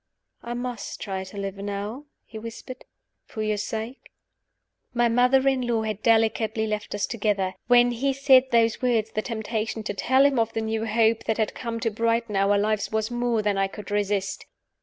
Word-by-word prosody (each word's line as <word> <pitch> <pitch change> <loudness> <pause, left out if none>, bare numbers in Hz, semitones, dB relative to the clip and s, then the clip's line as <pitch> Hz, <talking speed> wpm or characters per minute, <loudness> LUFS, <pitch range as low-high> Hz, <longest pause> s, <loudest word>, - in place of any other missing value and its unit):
"I 240 0 -5
must 245 -3 -5
try 190 -1 -4
to 190 +2 -11
live 195 0 -4
now," 205 +7 -5 0.2
he 220 - -9
whispered, 230 +3 -9 0.4
"for 215 - -5
your 215 -1 0
sake." 220 +5 -5 0.9
My 240 0 +3
mother 250 +3 +3
in 265 -1 +2
law 230 -2 +1
had 215 -1 -3
delicately 220 -1 +2
left 210 -1 -3
us 205 - 0
together. 205 -4 -1
When 245 0 +5
he 265 +4 0
said 265 -1 +5
those 230 -2 +2
words 230 -4 +1
the 215 - -1
temptation 220 0 -3
to 205 - -3
tell 260 +8 +3
him 275 -3 +3
of 225 0 0
the 225 - -1
new 220 0 -2
hope 225 +1 +2
that 220 - 0
had 220 -2 0
come 230 -2 -4
to 225 - 0
brighten 230 0 0
our 200 +1 +3
lives 210 0 0
was 220 +1 -1
more 240 -2 0
than 205 -1 +1
I 195 - +2
could 205 0 -10
resist. 205 -1 -1
220 Hz, 190 wpm, -25 LUFS, 210-240 Hz, 0.9 s, When